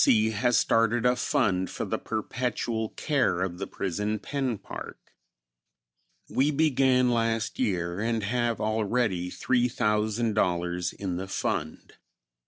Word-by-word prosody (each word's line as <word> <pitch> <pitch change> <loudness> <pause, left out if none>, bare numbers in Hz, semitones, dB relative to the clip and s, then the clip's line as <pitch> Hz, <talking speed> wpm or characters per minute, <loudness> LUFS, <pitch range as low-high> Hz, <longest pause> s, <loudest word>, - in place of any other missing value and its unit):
C. 110 0 +4
has 120 +2 +2
started 115 +1 +2
a 125 0 +4
fund 95 -7 +1
for - - -4
the - - -2
perpetual 120 -3 -2
care 135 - 0
of 90 -1 -4
the 95 - -3
Prison 105 +3 -2
Pen 130 0 -2
Park. - - -10 1.1
We 140 +3 +2
began 135 -4 +3
last 115 -1 0
year 90 -6 -1
and 115 0 0
have 120 +2 0
already 110 -4 0
$3,000 105 -7 0
in 95 -3 -3
the 95 +1 -4
fund. 80 -4 -3
110 Hz, 120 wpm, -27 LUFS, 95-125 Hz, 1.1 s, C